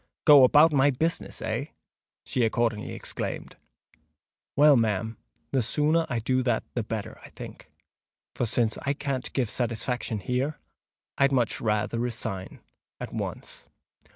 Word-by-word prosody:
"Go 145 Hz, -4 st, +9 dB
about 150 Hz, +5 st, +6 dB
my 140 Hz, 0 st, +5 dB
business, 160 Hz, +5 st, -2 dB
eh!" -, -, -2 dB, 0.6 s
she 125 Hz, -, 0 dB
accordingly 115 Hz, -1 st, 0 dB
exclaimed. -, -, -5 dB, 1.0 s
"Well, 145 Hz, 0 st, +7 dB
ma'am—the 110 Hz, +3 st, -2 dB
sooner 155 Hz, +7 st, +1 dB
I 125 Hz, -, -1 dB
do 130 Hz, +3 st, +1 dB
that 120 Hz, -3 st, 0 dB
the 120 Hz, -, -1 dB
better, 110 Hz, -1 st, -5 dB
I -, -, -11 dB
think: -, -, -11 dB, 0.6 s
for 120 Hz, -, -1 dB
since 115 Hz, 0 st, 0 dB
I 140 Hz, -, 0 dB
can't 140 Hz, -3 st, -3 dB
give 130 Hz, -4 st, +1 dB
saytisfaction 120 Hz, 0 st, -2 dB
here, 130 Hz, +7 st, -1 dB, 0.6 s
I'd 140 Hz, 0 st, +4 dB
much 125 Hz, -4 st, +1 dB
rayther 105 Hz, +1 st, 0 dB
resign 110 Hz, -5 st, -4 dB, 0.4 s
at -, -, -6 dB
once." -, -, -6 dB
125 Hz, 130 wpm, -27 LUFS, 115-140 Hz, 1.0 s, Go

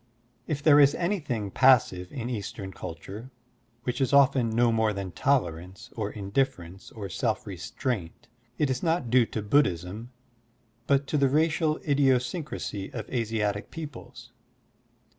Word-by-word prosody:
If 145 Hz, -2 st, -3 dB
there 150 Hz, -2 st, +7 dB
is 140 Hz, 0 st, +6 dB
anything 145 Hz, -, -2 dB
passive 110 Hz, -9 st, +4 dB
in 120 Hz, -4 st, -5 dB
Eastern 100 Hz, -4 st, -5 dB
culture, 95 Hz, +8 st, -8 dB, 0.5 s
which 125 Hz, +2 st, -2 dB
is 130 Hz, 0 st, +1 dB
often 135 Hz, -4 st, +5 dB
no 115 Hz, +1 st, +3 dB
more 110 Hz, -1 st, +2 dB
than 100 Hz, -2 st, -5 dB
tolerance 95 Hz, -, -1 dB
or 105 Hz, -2 st, -3 dB
indif 115 Hz, +7 st, 0 dB
ference 90 Hz, +2 st, -12 dB
or 100 Hz, -2 st, -4 dB
self 110 Hz, +4 st, -2 dB
restraint, 95 Hz, -, -4 dB, 0.3 s
it 145 Hz, -3 st, +1 dB
is 130 Hz, -, -2 dB
not 165 Hz, -8 st, 0 dB
due 125 Hz, -2 st, +5 dB
to 110 Hz, -, -4 dB
Buddhism 105 Hz, -, 0 dB, 0.8 s
but 140 Hz, 0 st, +3 dB
to 145 Hz, +2 st, 0 dB
the 140 Hz, -1 st, +4 dB
racial 155 Hz, +2 st, +2 dB
idiosyncrasy 135 Hz, -, 0 dB
of 110 Hz, -3 st, -6 dB
Asiatic 110 Hz, -4 st, -1 dB
peoples. 155 Hz, -7 st, -9 dB
120 Hz, 140 wpm, -27 LUFS, 100-140 Hz, 0.8 s, there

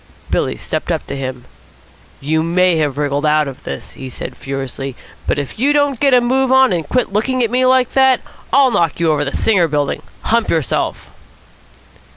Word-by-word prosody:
Billy -, -, 0 dB
stepped -, -, -3 dB
up -, -, -2 dB
to -, -, -5 dB
him. 130 Hz, -2 st, -5 dB, 0.7 s
"You 155 Hz, +3 st, 0 dB
may 175 Hz, +1 st, +2 dB
have 145 Hz, -3 st, -1 dB
wriggled 145 Hz, 0 st, -1 dB
out 150 Hz, -1 st, +2 dB
of 135 Hz, -2 st, -8 dB
this," -, -, -6 dB
he 130 Hz, -1 st, -9 dB
said -, -, -7 dB
furiously, 135 Hz, -1 st, -5 dB, 0.3 s
"but -, -, +1 dB
if 145 Hz, +7 st, -5 dB
you 280 Hz, +4 st, +3 dB
don't 285 Hz, -4 st, +1 dB
get 280 Hz, -1 st, +3 dB
a -, -, +6 dB
move 260 Hz, +2 st, +1 dB
on 265 Hz, -5 st, +5 dB
and 165 Hz, -4 st, -3 dB
quit 250 Hz, -6 st, 0 dB
looking 255 Hz, +4 st, +1 dB
at 230 Hz, -, -1 dB
me 255 Hz, +1 st, +2 dB
like 255 Hz, -1 st, +3 dB
that, 265 Hz, -1 st, +4 dB, 0.3 s
I'll 275 Hz, -2 st, +5 dB
knock 165 Hz, -7 st, +1 dB
you 165 Hz, -2 st, +2 dB
over 150 Hz, -1 st, +1 dB
the 140 Hz, -, -3 dB
Singer 190 Hz, -3 st, +2 dB
Building. 145 Hz, -2 st, -1 dB, 0.2 s
Hump 230 Hz, 0 st, +1 dB
yourself." 160 Hz, -6 st, -1 dB
170 Hz, 190 wpm, -17 LUFS, -, 0.7 s, a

